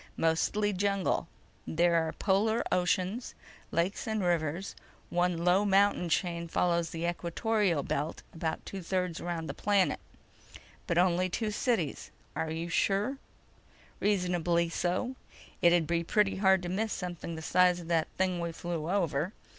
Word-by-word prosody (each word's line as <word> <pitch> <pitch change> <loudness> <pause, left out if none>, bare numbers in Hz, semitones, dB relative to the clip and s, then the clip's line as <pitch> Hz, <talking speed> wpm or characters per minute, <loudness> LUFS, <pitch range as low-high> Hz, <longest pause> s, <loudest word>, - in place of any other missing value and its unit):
"Mostly 205 +6 +1
jungle. 195 -2 0 0.4
There 170 +2 +2
are - - -4
polar 215 +4 +1
oceans, 185 +6 0 0.3
lakes 175 +7 -1
and 220 -2 -1
rivers. 170 +1 -1 0.4
One 175 0 +1
low 180 +3 +4
mountain 200 -3 +3
chain 170 -1 0
follows 170 0 +1
the 165 0 -4
equatorial 175 0 0
belt 150 +3 -3
about 160 -1 -3
two 195 - -6
thirds 180 -1 -2
around 170 -2 -3
the - - -4
planet." 200 -2 +2 0.9
"But 170 -4 0
only 180 +1 +3
two 215 +4 -2
cities. 210 - -1 0.3
Are 160 - -2
you 165 +2 -3
sure?" 200 +9 +1 0.8
"Reasonably 175 -4 +1
so. 185 +10 -1 0.4
It'd 170 -1 +5
be 170 +1 0
pretty 200 +3 +2
hard 190 -2 +4
to 175 - -3
miss 215 +4 -1
something 175 -2 -5
the 160 - -7
size 180 +1 +4
of 170 - -9
that 165 -2 +2
thing 185 -1 +1
we 170 0 -2
flew 170 -1 -4
over. 175 -2 0
180 Hz, 145 wpm, -30 LUFS, 170-195 Hz, 0.9 s, It'd